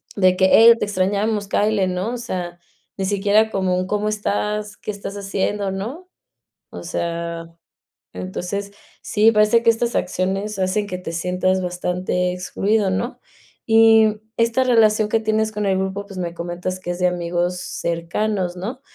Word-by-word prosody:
de 185 -2 +4
que: 190 - +4
"Ey, 230 +4 +8
te - - -1
extrañamos, 205 +2 0
cáele", 210 -2 +1
¿no? 185 +5 -2
O - - -3
sea, 180 -7 -5 0.4
ni 195 - -2
siquiera 205 +2 +2
como 185 -2 0
un: 185 - -1
"¿Cómo 210 +1 -1
estás? 210 0 -2
¿Qué - - -5
estás 200 -1 -7
haciendo?", 200 0 -2
¿no? 250 - -6 0.6
O - - -8
sea, 170 0 -3 0.7
entonces, 180 - -5 0.3
sí, 215 +2 +4
parece 215 +1 +4
que 230 - +5
estas 230 +1 +1
acciones 190 +3 -1
hacen 190 +2 0
que 185 - -4
te 180 -2 -6
sientas 180 +2 0
bastante 180 0 -1
excluido, 200 +3 0
¿no? 210 +7 -3 0.5
Y 225 -1 +5 0.2
esta 230 +3 +2
relación 220 -4 +4
que 225 - +2
tienes 220 0 0
con 210 -1 -3
el 190 -1 +2
grupo, 190 +1 -3
pues, 195 -2 -10
me 175 -2 -3
comentas 175 +2 -4
que 175 -1 -4
es 175 - -5
de 180 - +3
amigos 175 0 -1
cercanos, 175 +3 -2
¿no? 225 +9 -5
195 Hz, 160 wpm, -21 LUFS, 180-215 Hz, 0.7 s, Ey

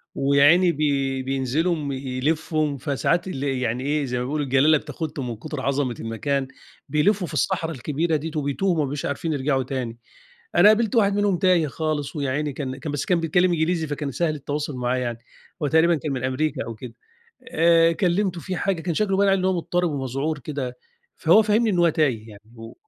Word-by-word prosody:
ويا 140 +1 +3
عيني 175 +4 +6
بي 135 -3 0
بينزلوا 140 +3 -1
يلفوا، 145 +3 -1
فساعات 150 +7 0
ال 140 -6 -4
يعني 125 -3 -1
إيه، 145 +1 0
زي 125 -1 -3
ما - - -2
بنقول 150 +3 -2
الجلالة 140 +3 +4
بتاخدهم 150 -3 -5
من 115 - -4
كتر 150 +4 -6
عظمة 135 -3 -1
المكان، 135 +4 -2 0.4
بيلفوا 180 +5 +2
في - - -10
الصحرا 170 -4 0
الكبيرة 155 +4 -1
ديّة 155 +2 -3
وبيتوهوا 150 +6 0
وما 155 -3 +1
بيبقوش 145 +1 -4
عارفين 155 +3 -2
يرجعوا 135 -1 0
تاني. 125 -3 -4 0.6
أنا 195 - +7
قابلت 220 +2 +2
واحد 205 -3 +3
منهم 205 -3 +1
تايه 180 -4 +3
خالص 155 +1 -3
ويا 140 -2 -1
عيني 150 +1 -2
كان 130 -2 -4
كان 150 - -5
بس 145 -1 -2
كان 180 -2 +2
بيتكلم 175 +3 +2
إنجليزي 160 0 0
فكان 145 -1 -4
سهل 155 +4 -1
التواصل 145 0 -4
معاه 125 0 -1
يعني، 120 -2 -3 0.4
وتقريبًا 160 +2 +3
كان 150 -1 -4
من 130 -2 -3
أمريكا 130 +4 -1
أو 115 - -6
كده. 115 +1 -9 0.6
آآ، 165 +1 +4
كلمته 180 +2 0
في 185 - -4
حاجة، 190 -4 -1
كان 175 0 -2
شكله 195 +2 0
باين 200 0 +4
عليه 195 0 +3
إن 185 - -1
هو 190 - +2
مضطرب 175 0 -1
ومذعور 140 +2 -2
كده، 130 -3 -5 0.4
فهو 170 +7 +5
فهمني 220 +2 +2
إن 185 -4 +1
هو 170 -1 +5
تايه 130 -9 0
يعني 100 -1 -13
و 115 0 -10
150 Hz, 195 wpm, -23 LUFS, 135-170 Hz, 0.6 s, أنا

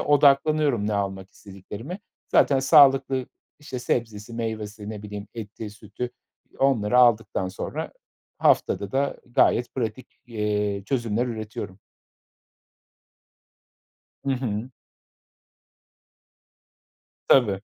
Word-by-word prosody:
odaklanıyorum 145 -4 +3
ne 105 - 0
almak 95 -1 -3
istediklerime. 105 - -9 0.3
Zaten 140 - +4
sağlıklı, 135 -2 +5 0.3
işte, 145 -4 -6
sebzesi, 115 -3 -2
meyvesi 110 -2 -5
ne 105 -2 -7
bileyim 105 0 -7
eti, 110 -1 -7
sütü, 105 +3 -7 0.4
eee, - - -23
onları 125 -4 +3
aldıktan 115 -6 +3
sonra 95 - -5 0.5
haftada 100 -1 +2
da 140 +1 0
gayet 120 0 +2
pratik, 120 -1 -3 0.2
eee, 105 -3 -1
çözümler 120 -2 0
üretiyorum. 110 -5 -6 2.5
Hı 135 - +1
hı. 125 -2 -3 2.6
Tabii. 105 -8 +4
115 Hz, 90 wpm, -25 LUFS, 105-130 Hz, 2.6 s, sağlıklı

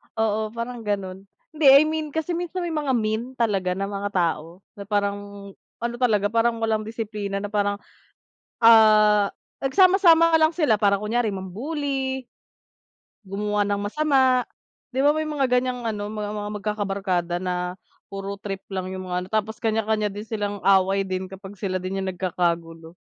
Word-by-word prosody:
oo, 220 -1 0
parang 235 +1 -4
ganun. 195 -1 -3 0.2
Hindi, 310 -1 -2
I 275 +2 +9
mean 310 0 -2
kasi 320 +2 -1
minsan 350 +1 -3
may 345 - -3
mga 295 -4 0
mean 225 +3 -2
talaga 195 -6 0
na 195 +1 -3
mga 200 0 -3
tao. 170 +1 -1 0.2
Na - - -5
parang 200 -1 0 0.7
ano 235 0 -2
talaga, 210 -5 +2
parang 230 0 +1
walang 220 -1 0
disiplina 210 -3 -4
na - - -2
parang, 205 -1 +1 0.9
ah, 215 -2 +6 0.4
nagsama-sama 340 +1 +5
lang 315 +1 +4
sila 295 -11 +3
para 200 -2 +4
kunyari 225 +2 0
mam-bully 265 - -3 1.0
gumawa 205 +1 -1
ng 200 0 -1
masama, 260 +1 +2 0.5
'di 260 - +1
ba 290 - +5
may 310 0 -1
mga 295 -3 0
ganyang 250 -1 -2
ano, 210 -3 -3
ma 210 0 -4
mga 210 0 -4
magkakabarkada 195 -4 -1
na 180 -1 -2 0.3
puro 195 0 -6
trip 195 -2 -5
lang 185 -1 -3
yung 185 0 -6
mga 180 0 -1
ano, - - -16
tapos 220 +1 -2
kanya-kanya 220 -1 0
din 205 +1 -7
silang 205 -3 -4
away 195 0 +4
din 185 0 -3
kapag 195 +1 -11
sila 190 -2 -2
din 190 +1 -3
yung 190 - -3
nagkakagulo. 170 -3 -2
210 Hz, 160 wpm, -24 LUFS, 195-245 Hz, 1.0 s, I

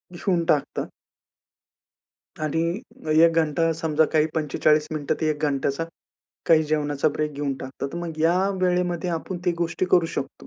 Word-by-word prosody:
घेऊन 175 -1 0
टाकतात. 150 -4 0 1.6
आणि 155 +1 0 0.6
1 165 - +5
घंटा, 165 0 +2
समजा 160 -1 +1
काही 155 -1 +4
45 155 0 +2
मिनिटं 150 -2 -1
ते 160 - +1
एक 150 0 -4
घंट्याचा, 140 +1 0 0.6
काही 160 -1 +5
जेवणाचा 150 -2 0
ब्रेक 150 +1 -2
घेऊन 140 -1 -2
टाकतात, 130 +1 -5
तर - - -5
मग 165 -2 -6
या 180 +4 +3
वेळेमध्ये 180 -1 0
आपण 170 +2 -3
ती 175 - +2
गोष्टी 170 +1 -1
करू 175 -2 +5
शकतो. 140 -3 -6
160 Hz, 150 wpm, -24 LUFS, 150-170 Hz, 1.6 s, 1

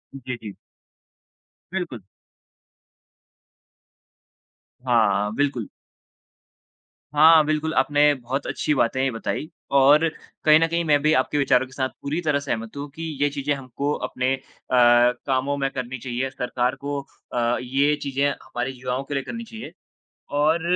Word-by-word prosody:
जी, 130 -1 -5
जी। 105 -3 -8 1.2
बिल्कुल। 170 - -4 2.8
हाँ, 120 -5 +3
हाँ, 105 - -2
बिल्कुल। 135 -6 -1 1.4
हाँ, 155 +1 +7
बिल्कुल, 155 +1 -1
आपने 145 0 +4
बहुत 130 +3 -4
अच्छी 150 - 0
बातें 130 +1 +1
बताई, 130 +6 -4 0.2
और 140 +4 +6 0.4
कहीं 155 0 +7
न 165 - +3
कहीं 170 +1 -1
मैं 145 -2 +3
भी 155 +1 +3
आपके 150 - +1
विचारों 130 -2 +3
के - - -20
साथ 130 -1 -1
पूरी 150 +5 -2
तरह 150 -4 +1
सहमत 115 -3 -4
हूँ 145 +1 -5
कि 165 - -6 0.2
ये 145 - +3
चीजें 145 +1 -1
हमको 140 +1 -3
अपने 130 +1 -1
अ, - - -14 0.3
कामों 125 +3 +3
में 135 -1 0
करनी 130 0 -5
चाहिए। 125 +2 -3
सरकार 125 0 -1
को 140 +1 -4 0.3
अ, 120 0 +1
ये 140 +4 +2
चीजें 140 0 0
हमारे 135 -2 -4
युवाओं 130 0 -4
के 145 - -7
लिए 135 -1 -1
करनी 230 0 -6
चाहिए। 225 0 -9 0.7
और 160 +3 +3
140 Hz, 140 wpm, -23 LUFS, 125-150 Hz, 2.8 s, हाँ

